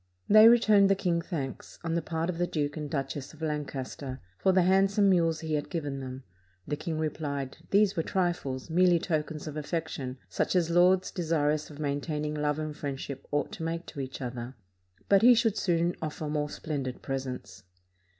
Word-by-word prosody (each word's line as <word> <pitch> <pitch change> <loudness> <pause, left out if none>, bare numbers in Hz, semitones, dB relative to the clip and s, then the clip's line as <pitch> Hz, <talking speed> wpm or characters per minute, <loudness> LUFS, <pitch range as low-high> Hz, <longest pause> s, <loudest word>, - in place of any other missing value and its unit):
They 215 +2 +9
returned 215 -4 +5
the 195 - +5
king 180 -3 0
thanks, 145 -7 -5
on 165 -1 -1
the 170 - +1
part 165 +1 -2
of 175 -2 -3
the 175 - +1
Duke 145 -3 -2
and 150 -2 -4
Duchess 135 +1 -4
of 155 - -18
Lancaster, 140 -3 -4 0.2
for 190 - +3
the 185 -1 +4
handsome 195 +2 +4
mules 165 -3 +2
he 160 -1 -3
had 150 -1 -1
given 145 -6 -3
them. 130 0 -7 0.4
The 150 - -1
king 160 +1 -4
repHed, 145 -3 -3
these 200 0 +4
were 165 - +1
trifles, 170 -8 -1
merely 175 +1 +4
tokens 155 -2 -2
of 155 -2 -6
affection, 150 -4 -3
such - - -1
as 170 -2 +2
lords 180 +2 +4
desirous 155 -3 0
of 150 - -11
maintaining 150 +1 -2
love 150 -1 0
and 155 -1 -4
friendship 140 -1 -5
ought 145 -1 -1
to - - -6
make 165 +1 -3
to - - -9
each 135 0 -5
other; 120 +1 -5 0.5
but 200 -1 +5
he 245 +1 +8
should 225 -2 +2
soon 175 -3 +1
offer 155 0 -4
more 150 0 -1
splendid 140 -5 -4
pres 135 0 -3
ents. 100 -7 -8
155 Hz, 190 wpm, -29 LUFS, 140-175 Hz, 0.5 s, They